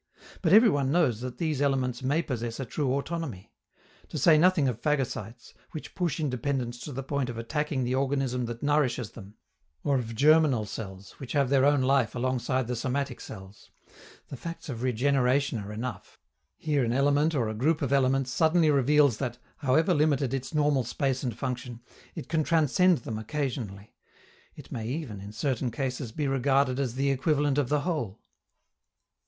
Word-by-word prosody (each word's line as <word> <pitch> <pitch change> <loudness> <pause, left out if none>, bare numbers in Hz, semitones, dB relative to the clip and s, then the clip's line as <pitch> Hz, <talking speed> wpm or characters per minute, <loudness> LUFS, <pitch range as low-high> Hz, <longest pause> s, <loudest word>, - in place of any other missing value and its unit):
But - - +1
every 225 +3 +8
one 140 -2 0
knows 135 -10 +2
that 125 -1 -6
these 155 -5 -1
elements 130 -3 0
may 145 +6 +1
possess 120 -4 -4
a 135 - -3
true 135 +2 -1
autonomy. 140 - -4 0.6
To - - -6
say 165 - +6
nothing 165 -2 +4
of 120 -2 -2
phagocytes, 120 -6 -2 0.2
which 155 - -7
push 175 -4 -1
independence 125 -3 -2
to 150 - -7
the 135 0 -5
point 135 -1 -2
of 120 - -6
attacking 140 +3 -2
the 125 +1 -1
organism 135 -2 0
that 120 +2 -6
nourishes 135 -6 +1
them, 105 -2 -12 0.5
or 140 -2 +2
of 115 -2 -5
germinal 145 -4 +4
cells, 95 -2 -8
which 135 - -6
have 140 -3 +2
their 135 -1 +4
own 145 -2 +3
life 130 -3 +2
alongside 130 0 0
the 125 +2 -3
somatic 130 +2 -2
cells 95 0 -11 0.6
the - - -6
facts 165 +4 -7
of 120 -3 -5
regeneration 130 +1 +1
are 100 0 -7
enough: 110 -1 -6 0.4
here 150 -4 0
an 115 0 0
element 145 +4 +2
or 120 -5 +1
a 110 - -3
group 150 +8 +1
of 140 0 0
elements 135 -1 +2
suddenly 160 +2 +3
reveals 140 -2 +4
that, 120 -3 -3 0.2
however 160 +6 +2
limited 145 -4 +1
its 135 -1 -3
normal 145 -4 +2
space 130 +2 -1
and 120 -5 -3
function, 125 -2 -4 0.4
it - - -6
can 160 -1 +1
transcend 165 +3 +3
them 110 -2 -4
occasionally; 110 -6 -4 0.6
it - - -13
may 110 -1 -4
even, 125 -7 -4
in 100 +1 -8
certain 125 +2 -1
cases, 125 0 -3
be 145 +5 -2
regarded 135 0 +2
as 130 -4 -2
the 140 +1 +1
equivalent 145 +1 +1
of 135 -4 0
the 150 0 +2
whole. 140 - -3
135 Hz, 175 wpm, -28 LUFS, 120-145 Hz, 0.6 s, every